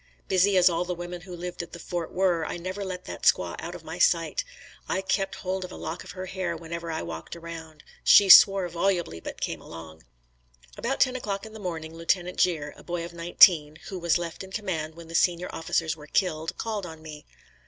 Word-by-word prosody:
Busy 190 +1 +3
as 180 0 +6
all 170 -1 +2
the 180 0 -3
women 175 0 -7
who 180 -1 -9
lived 175 +1 -5
at 170 - -10
the - - -6
fort 170 0 -4
were, 180 -3 +1
I - - -4
never 185 +3 -5
let 185 -1 -6
that - - -7
squaw - - +3
out - - -6
of - - -10
my - - -7
sight. - - +2 0.5
I 190 - 0
kept 195 0 -1
hold 185 0 -3
of 185 - -8
a - - -8
lock 160 +3 -5
of - - -10
her 185 -1 -6
hair 185 -3 -3
whenever 170 +1 -6
I 160 - -3
walked 85 - -7
around. 165 -2 -9 0.2
She 200 - +7
swore 195 0 +9
volubly, 175 - -1
but - - -8
came - - -3
along. 80 -1 -11 0.7
About 265 +4 -2
ten 255 -1 +4
o'clock 205 -4 -3
in 220 - -11
the 220 - -9
morning 165 -4 -5
Lieutenant 175 +2 -1
Gere, 150 -5 +1
a - - -15
boy 175 -1 -3
of 170 - -10
nineteen, 170 -2 +5
who 190 - -5
was 170 0 +2
left 170 +1 -5
in 190 - -10
command 165 -7 -3
when 170 -1 -11
the 165 - -10
senior 175 +1 +2
officers 165 0 -1
were 150 -1 -13
killed, 160 -2 -1
called 215 -5 -3
on 160 -1 -11
me. 150 -1 -10
175 Hz, 220 wpm, -27 LUFS, 165-190 Hz, 0.7 s, swore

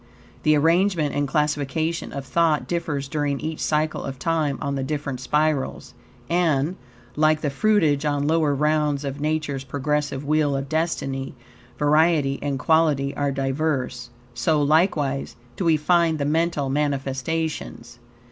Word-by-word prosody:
The 155 0 +4
arrangement 165 0 +2
and 145 0 0
classification 150 +3 -1
of 140 -1 -6
thought 160 +2 +1
differs 150 -5 -2
during 145 -1 -1
each 160 0 -4
cycle 155 0 0
of 135 -1 -5
time 155 -2 0
on 140 - -2
the 135 - -2
different 140 -2 -3
spirals, 150 +1 -1 0.3
and, 165 -2 +1 0.4
like 155 0 +3
the 145 - -1
fruitage 155 -3 +2
on 145 -1 0
lower 155 -2 +2
rounds 150 -1 +1
of 140 +1 -5
Nature's 150 -3 -1
progressive 145 0 -2
wheel 150 -1 +2
of 135 0 -4
destiny, 135 -4 -2 0.4
variety 150 -2 +3
and 140 -1 -2
quality 150 -2 +2
are 145 -1 0
diverse, 135 -2 -2 0.2
so, 140 +6 +1
likewise, 145 -2 +1 0.2
do 190 - -3
we 160 -2 +4
find 165 +1 +2
the 140 - -1
mental 160 -1 0
manifestations. 135 -2 -2
150 Hz, 140 wpm, -23 LUFS, 140-160 Hz, 0.4 s, The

